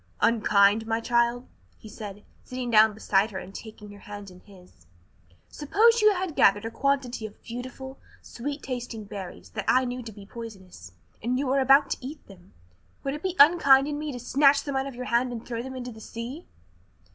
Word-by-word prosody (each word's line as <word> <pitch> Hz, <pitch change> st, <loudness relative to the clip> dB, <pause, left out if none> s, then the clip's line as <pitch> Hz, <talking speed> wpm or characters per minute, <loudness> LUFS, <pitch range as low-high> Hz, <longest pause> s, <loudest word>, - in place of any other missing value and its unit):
"Unkind, 215 Hz, -1 st, +3 dB
my 225 Hz, 0 st, 0 dB
child?" 235 Hz, +1 st, +1 dB, 0.3 s
he -, -, -13 dB
said, 205 Hz, -1 st, -9 dB, 0.2 s
sitting 255 Hz, -1 st, -5 dB
down 220 Hz, 0 st, +6 dB
beside 205 Hz, -1 st, +1 dB
her 195 Hz, -, -7 dB
and 190 Hz, +1 st, -8 dB
taking 210 Hz, -1 st, -10 dB
her 205 Hz, -, -13 dB
hand 205 Hz, -2 st, -9 dB
in 180 Hz, -, -15 dB
his. 180 Hz, -, -19 dB, 0.6 s
"Suppose 450 Hz, +10 st, +3 dB
you 425 Hz, 0 st, +6 dB
had 365 Hz, -4 st, -3 dB
gathered 205 Hz, +2 st, +4 dB
a 225 Hz, -, -4 dB
quantity 260 Hz, -4 st, -1 dB
of 205 Hz, -, -17 dB
beautiful, 255 Hz, +3 st, -8 dB, 0.2 s
sweet 285 Hz, +4 st, -6 dB
tasted 240 Hz, -4 st, -5 dB
berries 195 Hz, -3 st, -9 dB
that 210 Hz, -3 st, -5 dB
I 255 Hz, 0 st, +4 dB
knew 250 Hz, 0 st, -4 dB
to 230 Hz, -2 st, -8 dB
be 200 Hz, -1 st, -12 dB
poisonous, 190 Hz, -, -11 dB, 0.3 s
and 245 Hz, +3 st, -1 dB
were 270 Hz, +1 st, +2 dB
about 270 Hz, +2 st, +5 dB
to -, -, 0 dB
eat 285 Hz, +3 st, -8 dB
them; 190 Hz, -2 st, -17 dB, 0.5 s
would 275 Hz, -, -2 dB
it 295 Hz, -, -6 dB
be 370 Hz, 0 st, -2 dB
unkind 280 Hz, -3 st, +6 dB
in 295 Hz, 0 st, -3 dB
me 305 Hz, -1 st, -4 dB
to 245 Hz, -, -6 dB
snatch 275 Hz, +3 st, +3 dB
them 280 Hz, -2 st, -4 dB
out 265 Hz, +1 st, -1 dB
of 275 Hz, -, -8 dB
your 250 Hz, +1 st, -6 dB
hand 245 Hz, +1 st, +1 dB
and 235 Hz, -1 st, -7 dB
throw 235 Hz, -1 st, -4 dB
them 260 Hz, +1 st, -7 dB
into 250 Hz, -1 st, -6 dB
the 220 Hz, -1 st, -12 dB
sea?" 240 Hz, +10 st, -7 dB
240 Hz, 200 wpm, -26 LUFS, 210-270 Hz, 0.6 s, down